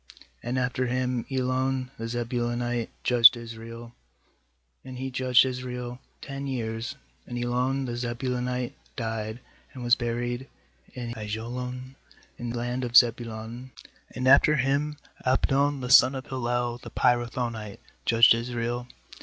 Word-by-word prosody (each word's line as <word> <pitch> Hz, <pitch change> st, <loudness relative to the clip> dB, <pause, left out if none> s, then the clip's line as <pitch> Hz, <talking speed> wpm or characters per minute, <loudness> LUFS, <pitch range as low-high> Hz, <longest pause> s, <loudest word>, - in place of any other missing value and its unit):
nAnd 120 Hz, +2 st, -2 dB
after 125 Hz, 0 st, 0 dB
V>iin 125 Hz, 0 st, -1 dB
Elon 130 Hz, 0 st, 0 dB
the 115 Hz, -, -3 dB
Zebulunite 120 Hz, 0 st, -2 dB
judged 125 Hz, 0 st, +7 dB
Israel; 115 Hz, 0 st, -9 dB, 0.9 s
and 130 Hz, -1 st, -8 dB
he 130 Hz, +1 st, -4 dB
judged 130 Hz, 0 st, +4 dB
Israel 125 Hz, -1 st, -5 dB, 0.2 s
ten 140 Hz, 0 st, -5 dB
years. 115 Hz, 0 st, -3 dB, 0.3 s
12And 120 Hz, 0 st, -3 dB
Elon 130 Hz, +2 st, 0 dB
the 120 Hz, -, -4 dB
Zebulunite 125 Hz, +1 st, -2 dB, 0.2 s
died, 110 Hz, 0 st, -4 dB, 0.3 s
and 125 Hz, -, -7 dB
was 120 Hz, 0 st, +3 dB
buried 120 Hz, +2 st, -3 dB, 0.5 s
in 120 Hz, -2 st, -5 dB
Aijalon 125 Hz, +4 st, -5 dB, 0.5 s
in 120 Hz, -, -4 dB
the 120 Hz, -, -3 dB
land 120 Hz, +2 st, -2 dB
of 120 Hz, 0 st, +4 dB
Zebulun. 115 Hz, +1 st, +1 dB, 0.4 s
13And 130 Hz, 0 st, -1 dB
after 140 Hz, +3 st, +7 dB
him 140 Hz, +2 st, 0 dB, 0.3 s
Abdpn 135 Hz, +2 st, +2 dB
the 125 Hz, 0 st, -3 dB
son 130 Hz, +1 st, +8 dB
of 130 Hz, -, -5 dB
Hillel 120 Hz, -1 st, -2 dB
the -, -, -10 dB
Pirathonite 120 Hz, -3 st, 0 dB, 0.2 s
judged 115 Hz, 0 st, +6 dB
Israel. 120 Hz, +1 st, -3 dB
125 Hz, 130 wpm, -27 LUFS, 120-130 Hz, 0.9 s, son